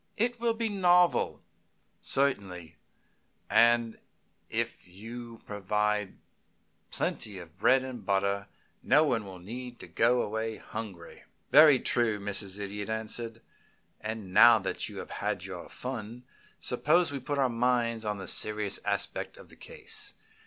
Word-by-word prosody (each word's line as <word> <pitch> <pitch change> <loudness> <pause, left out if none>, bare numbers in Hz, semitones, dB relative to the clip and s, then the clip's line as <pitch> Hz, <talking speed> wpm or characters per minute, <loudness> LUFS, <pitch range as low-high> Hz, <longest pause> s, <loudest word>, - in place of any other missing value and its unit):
It 240 +2 +1
will 230 -1 +1
be 225 0 -1
novel, 180 -4 +3 0.6
certainly, 95 -12 0 0.8
and 115 -1 +4 0.5
if - - -3
you 115 +5 -10
provide 105 0 -1 0.7
plenty 105 -3 -3
of 85 0 -12
bread 130 +5 +4
and 130 -4 -7
butter 100 0 0 0.3
no 145 +4 +5
one 100 - -2
need 125 +3 -7 0.2
go 120 +2 +3
away 110 +1 -3
hungry." 100 -7 -8 0.3
"Very 150 -2 +8
true," 115 -4 +2
Mrs. 100 -1 -2
Idiot 100 +1 -5
answered. 110 +1 -3 0.6
"And 105 -4 -6
now 120 +2 +8
that 100 - -2
you - - -10
have - - -7
had 100 -3 -2
your 90 -3 -8
fun, 120 -1 -6 0.4
suppose 155 +6 +2
we 140 - -3
put 145 +3 -3
our 135 -2 +3
minds 120 -1 0
on 105 -1 -2
the 95 - -7
serious 105 -2 +1
aspect - - -2
of - - -14
the - - -11
case. - - -4
115 Hz, 130 wpm, -29 LUFS, 100-125 Hz, 0.8 s, Very